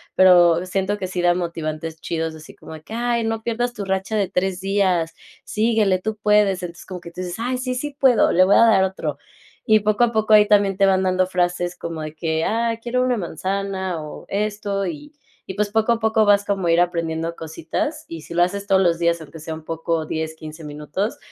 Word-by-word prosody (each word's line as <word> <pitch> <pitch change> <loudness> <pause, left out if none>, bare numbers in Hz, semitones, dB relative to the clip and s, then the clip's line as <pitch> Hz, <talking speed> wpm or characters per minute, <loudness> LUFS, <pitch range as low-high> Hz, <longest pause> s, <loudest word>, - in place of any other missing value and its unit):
pero 175 -2 +6
siento 190 +2 -1
que 195 - -4
sí 180 -1 -3
da 175 0 +4
motivantes 160 -2 -4
chidos, 165 -1 -3
así 155 0 -13
como - - -12
de 155 - -9
que: 185 - -11
"Ay, 235 0 0
no 225 0 -2
pierdas 240 +1 -1
tu 205 - -5
racha 190 +3 -2
de 200 -3 0
3 185 0 -1
días, 185 -4 +1 0.3
síguele, 215 -4 +1
tú 220 +3 -4
puedes". 210 -3 +2
Entonces, 170 -1 -8
como 185 -2 -7
que 170 - -10
tú 180 - -7
dices: 180 -1 -4
"Ay, 250 +2 -1
sí, 255 0 -2
sí 290 +3 -4
puedo, 255 -4 +4
le 185 - +5
voy 195 - +4
a - - +6
dar 200 -4 +5
otro". 165 -6 -3 0.5
Y 215 0 +5
poco 215 +2 +1
a 240 - +3
poco 220 -1 +1
ahí 210 -1 +8
también 200 -2 +3
te 195 - +4
van 190 -1 +3
dando 185 0 +2
frases 175 -1 -1
como 165 -2 -5
de 155 0 -6
que: 160 0 -1
"Ah, 230 0 0
quiero 245 +2 -1
una 255 -1 +1
manzana 190 0 -3
o 150 - -9
esto". 205 -1 -2
Y 295 -2 -7 0.3
y 190 - -6
pues, 210 0 -1
poco 220 +2 +2
a 230 - -3
poco 220 -1 +2
vas 205 0 +4
como 195 -3 -1
a - - +3
ir 165 - +4
aprendiendo 165 -1 -1
cositas. 165 - -4
Y 165 -1 -7
si 170 - -10
lo 175 +1 +4
haces 200 +3 -2
todos 190 -1 +4
los 170 -2 +2
días, 170 0 +1
aunque 160 +1 -11
sea 160 +1 -6
un 160 0 -12
poco 165 0 -2
10 160 0 -4
15 155 +1 -10
minutos, 150 +8 -4
190 Hz, 230 wpm, -21 LUFS, 170-215 Hz, 0.5 s, ahí